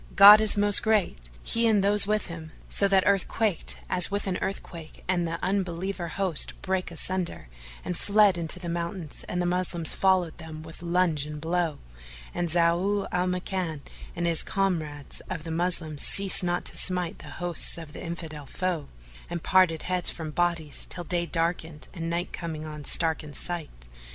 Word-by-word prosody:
God 205 +2 +10
is 215 -1 +5
most 205 0 +6
great! 190 - 0
he 230 0 +1
and 210 -3 +3
those 205 0 +8
with 215 0 0
him, 160 -2 -9
so 200 - +2
that 195 -1 +3
earth 200 -2 +2
quaked 215 -6 -1
as 180 -1 +3
with 200 +1 -2
an 185 -2 -2
earthquake 170 -4 -6
and 175 -2 0
the 165 0 -3
Unbeliever 185 -1 -2
host 180 -2 -1
brake 190 -1 -1
asunder 170 - -3 0.4
and 180 - -3
fled 205 +1 +3
into 170 0 +1
the 180 -1 -8
mountains 170 -1 -5
and 180 - -2
the 175 - 0
Moslems 175 -2 -1
followed 185 -4 +1
them 160 -1 -9
with 160 +1 -12
lunge 170 -4 0
and 150 0 -7
blow; 165 -1 -1 0.6
and 175 -1 -2
Zau 175 +5 +1
al 180 +1 0
Makan 180 -4 -3 0.3
and 175 - -2
his 170 -2 +3
comrades 160 -8 -2
of 160 - -5
the 165 - -6
Moslems 165 -3 -2
ceased 195 -1 +5
not 175 0 -1
to - - -3
smite 180 -3 0
the - - -11
hosts 175 -1 0
of 160 -3 -10
the - - -8
Infidel 160 -4 -6
foe, 180 -4 -3 0.4
and 170 -1 -5
parted 185 -4 +3
heads 180 -1 0
from 160 -2 -6
bodies 170 -2 -1
till 175 - -3
day 170 +1 -1
darkened 165 -2 -2
and 165 -1 -5
night 170 +2 -3
coming 160 -2 -5
on 150 -1 -8
starkened 160 -2 0
sight. 160 - -6
175 Hz, 175 wpm, -26 LUFS, 160-185 Hz, 0.6 s, God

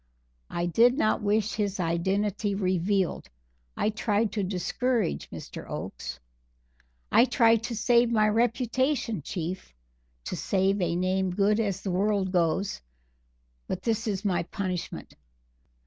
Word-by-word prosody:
I 175 - -2
did 235 - +4
not 215 -8 +2
wish 210 +1 +1
his 205 -2 -2
identity 195 +4 0
revealed; 185 0 0 0.5
I 215 - +1
tried 215 0 0
to 210 0 -1
discourage 195 - -1
Mr. - - -9
Oakes. - - -6 0.9
I 240 - +6
tried 230 -3 +4
to 240 -1 -3
save 235 +2 +3
my 215 -2 +3
reputation, 240 - +1
Chief 170 - -5 0.5
to - - -4
save 195 +1 +1
a 170 -1 0
name 185 +1 +1
good 200 +4 +2
as 200 -4 -1
the 190 - -3
world 195 0 +1
goes; 180 +2 0 0.9
but - - -4
this 225 0 0
is 200 -1 -2
my 185 -3 +2
punishment. 185 -1 -5
200 Hz, 130 wpm, -27 LUFS, 185-225 Hz, 0.9 s, I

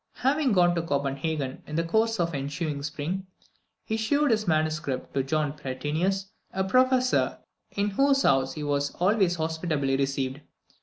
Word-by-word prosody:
Having 275 -2 +3
gone 175 -2 +4
to 170 - 0
Copenhagen 140 -2 -2
in 150 - -5
the 165 - +1
course 220 +5 +1
of 170 -1 +1
the 140 - -3
ensuing 145 +1 -3
spring, 160 +6 -4 0.6
he 220 - -1
shewed 285 +6 +2
this 215 -2 +1
manuscript 155 -4 -1
to 135 - +1
John 145 +1 0
Pratensis, 155 +7 -2 0.3
a 190 - -1
Professor, 255 +5 +3 0.3
in 205 0 -1
whose 275 +5 +3
house 135 -1 +3
he 150 - -5
was 145 -1 -1
always 185 -1 +2
hospitably 160 -4 -1
received. 135 0 -1
160 Hz, 155 wpm, -27 LUFS, 140-200 Hz, 0.6 s, gone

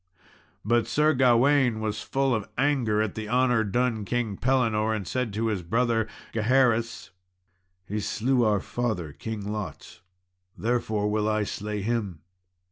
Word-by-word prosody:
But 115 +2 +2
Sir 150 +6 +3
Gawain 130 -1 +4
was 110 -1 -3
full 135 -1 0
of 110 -3 -2
anger 125 -6 +2
at 110 - -3
the 110 -1 -6
honour 125 -1 +3
done 115 +1 0
King 115 -1 -2
Pellinore, 110 -3 +1
and 100 -4 -5
said 125 -3 -2
to 110 +2 -1
his 105 -5 -1
brother 115 +4 +1 0.3
Gaheris, 115 0 +1 0.7
"He 105 +2 -3
slew 120 +5 +1
our 105 -3 +2
father, 105 -13 -3
King 105 +1 -5
Lot, 105 -4 -7 0.6
therefore 110 -3 0
will 105 0 0
I 110 0 +1
slay 105 0 -4
him." 105 -7 -2
110 Hz, 140 wpm, -26 LUFS, 105-125 Hz, 0.7 s, Gawain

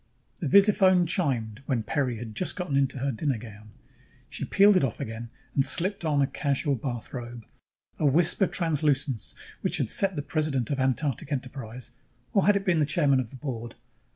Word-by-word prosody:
The 160 - -2
visiphone 190 0 +5
chimed 130 - -1
when 125 -5 0
Peri 130 -1 -1
had 110 -1 -7
just 180 - -2
gotten 180 -7 -3
into 135 0 +1
her 135 +2 -1
dinner 135 +2 -1
gown. 105 -1 -11 0.6
She - - -4
peeled 200 +1 +5
it 185 - +3
off 125 -5 -2
again 115 +1 -6 0.2
and 135 - +3
slipped 190 +7 0
on 145 -3 +2
a - - +4
casual 140 -1 -1
bathrobe: 120 -1 -5 0.5
a 155 - +3
wisp 165 +8 +3
of 195 - +4
translucence 145 - 0 0.3
which - - +1
had - - -1
set 195 -2 0
the 145 - -3
president 150 -5 -1
of 140 - -1
Antarctic 135 +1 -1
Enterprise 125 -3 -5 0.4
or 200 - +3
had 205 - +6
it 200 0 -1
been 175 -4 +3
the 150 - +3
chairman 145 -4 +3
of 125 -4 -3
the - - -12
board? 120 -4 -6
140 Hz, 185 wpm, -27 LUFS, 120-165 Hz, 0.6 s, had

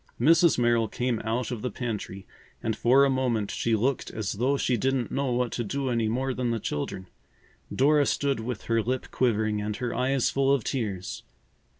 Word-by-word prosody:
Mrs. 165 +6 +5
Merrill 120 -2 +2
came 120 -1 -1
out 115 +3 -2
of 120 -4 -4
the 125 - -2
pantry 105 -5 -5 0.4
and 110 - 0
for 130 +5 +5
a - - +2
moment 120 -6 0
she 115 -1 0
looked 125 +5 0
as 110 -3 -3
though 130 +7 +1
she 125 - +1
didn't 130 +1 0
know 135 -2 -1
what 125 0 0
to 120 - -2
do 135 +5 -2
any 115 -2 +1
more 130 +4 -1
than 125 -1 -1
the 115 -1 -1
children. 95 +2 -4 0.7
Dora 145 +1 +3
stood 140 -3 0
with 115 0 -5
her 115 -1 +1
lip 130 +3 -3
quivering 110 -4 +1
and 105 0 -3
her 125 0 -3
eyes 130 0 +1
full 135 0 +2
of 140 -5 +2
tears. 100 -9 -3
120 Hz, 195 wpm, -27 LUFS, 110-130 Hz, 0.7 s, Mrs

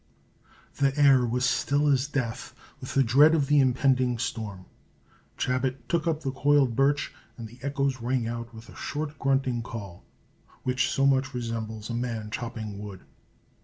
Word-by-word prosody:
The 140 0 +1
air 135 -4 +6
was 125 +2 0
still 140 +4 +1
as 135 -1 +2
death 125 -6 -4 0.2
with - - -7
the 135 - +5
dread 145 +7 +6
of 145 -3 +2
the 145 +1 +4
impending 130 -1 +2
storm. 110 -6 -4 0.7
Chabot 130 0 0
took 170 0 0
up 160 -2 0
the 135 - -1
coiled 135 -2 +3
birch, 140 +2 +1 0.2
and 115 -2 -7
the 120 +3 -16
echoes 140 -2 -1
rang 120 -1 0
out 115 0 -5
with 115 0 -12
a - - -14
short 150 0 -5
grunting 135 -3 +1
call, 100 -6 -8 0.6
which 130 +1 +1
so 135 - +1
much 135 -1 +2
resembles 115 -2 -4
a - - -3
man 115 -3 -3
chopping 110 -4 -5
wood. 100 -3 -8
130 Hz, 165 wpm, -27 LUFS, 115-140 Hz, 0.7 s, air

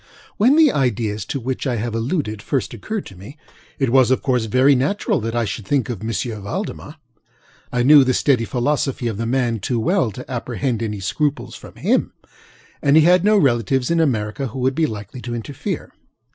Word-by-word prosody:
When 250 +7 +4
the 315 -3 +6
ideas 110 -6 -1
to 140 - -3
which 130 +3 -3
I 125 - 0
have 115 +1 -3
alluded 115 - -2
first 135 +3 -2
occurred 195 - -5
to 95 - -12
me, 100 - -12 0.4
it 135 -4 0
was 130 -1 +5
of 130 - +1
course 125 -4 +1
very 130 +6 +4
natural 140 +10 0
that 115 0 -4
I 120 -1 +1
should 100 0 -5
think 140 -2 0
of 115 -5 -4
M. 110 +1 -3 0.3
Valdemar. 100 - -5 0.8
I 125 0 +1
knew 145 +1 +8
the 130 -1 +1
steady 125 -5 +2
philosophy 135 +1 -1
of 110 -4 -2
the 115 +1 -2
man 120 -2 0
too 115 +4 -2
well 170 - +1
to 125 +5 -9
apprehend 120 -1 -3
any 105 -3 -3
scruples 145 +9 -2
from - - -12
him; - - 0 0.7
and 140 0 +3
he 160 - +7
had 180 +2 +5
no 210 +1 +4
relatives 130 - +1
in 170 - +2
America 125 -3 0
who 125 - -8
would 130 +1 +1
be 160 +2 +1
likely 110 +3 -8
to 120 -1 -5
interfere. 120 +4 -5
125 Hz, 200 wpm, -20 LUFS, 115-140 Hz, 0.8 s, knew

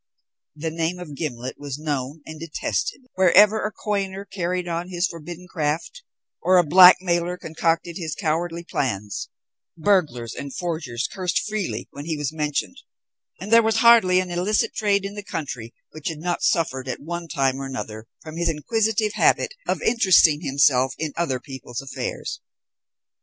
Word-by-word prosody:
The 160 +2 -4
name 165 +2 -1
of 175 -5 -8
Gimblet 130 -4 -5
was 145 -2 -5
known 145 -1 -4
and 155 -1 -9
detested 165 - -3
wherever 205 +4 +5
a 210 - -1
coiner 200 -2 -3
carried 180 -2 -3
on 170 +1 -3
his 175 0 0
forbidden 175 +1 -7
craft, 165 - -2 0.4
or 185 0 +4
a 175 - +6
blackmailer 180 +1 +6
concocted 165 +1 -1
his 160 -3 -4
cowardly 170 +2 -2
plans; 105 - -3 0.5
burglars 155 - +1
and 140 -1 -7
forgers 155 -8 -3
cursed 180 -2 -1
freely 215 -3 -3
when 145 +1 -8
he 160 -1 -2
was 150 0 -3
mentioned, 150 -2 -2 0.6
and 205 +4 -3
there 230 - +9
was 225 0 +1
hardly 225 -6 +6
an 185 -1 -3
illicit 185 +5 +1
trade 200 -2 +1
in 200 - -5
the 205 - -6
country 130 - -5 0.2
which 155 -2 -7
had 160 - -3
not 175 +3 -2
suffered 135 -6 0
at 130 - -3
one 170 +3 -5
time 135 -3 0
or 135 - -4
another 110 -4 -6 0.2
from 155 0 -8
his 170 0 +1
inquisitive 215 +6 0
habit - - +2
of - - -1
interesting 185 -9 +5
himself 135 -3 +3
in 155 -3 -3
other 145 -7 -1
people's 130 -3 -8
affairs. 135 -1 -5
165 Hz, 160 wpm, -23 LUFS, 145-185 Hz, 0.6 s, there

